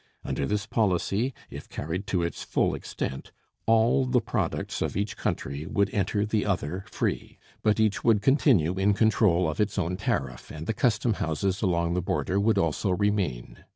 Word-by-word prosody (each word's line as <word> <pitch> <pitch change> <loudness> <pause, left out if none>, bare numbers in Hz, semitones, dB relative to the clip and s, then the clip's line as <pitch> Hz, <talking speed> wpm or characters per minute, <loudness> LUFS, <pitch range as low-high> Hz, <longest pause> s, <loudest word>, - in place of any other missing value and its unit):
Under 70 - -1
this 105 -1 -1
policy, 105 +3 +1 0.2
if - - -9
carried 85 +6 -4
to 90 -3 0
its 85 - -3
full - - 0
extent, 65 - -5 0.4
all 115 +4 +4
the 125 0 +3
products 110 -7 -2
of - - -1
each 100 +1 -2
country 70 +3 -3
would 100 -1 0
enter 100 +1 0
the 110 -1 0
other 90 -1 -2
free, - - -3 0.2
but 105 0 +2
each 110 -2 +1
would 115 -3 +4
continue 110 - +3
in 100 +1 +3
control 100 -5 +3
of 80 +6 -1
its 105 -2 -1
own 90 +3 -1
tariff, 65 -9 -2
and 75 +1 -7
the 110 - -1
customhouses 100 - 0
along 85 -4 +1
the 90 - 0
border 90 +2 0
would 110 +2 +2
also 85 +5 0
remain. 95 - -1
100 Hz, 170 wpm, -27 LUFS, 85-110 Hz, 0.4 s, all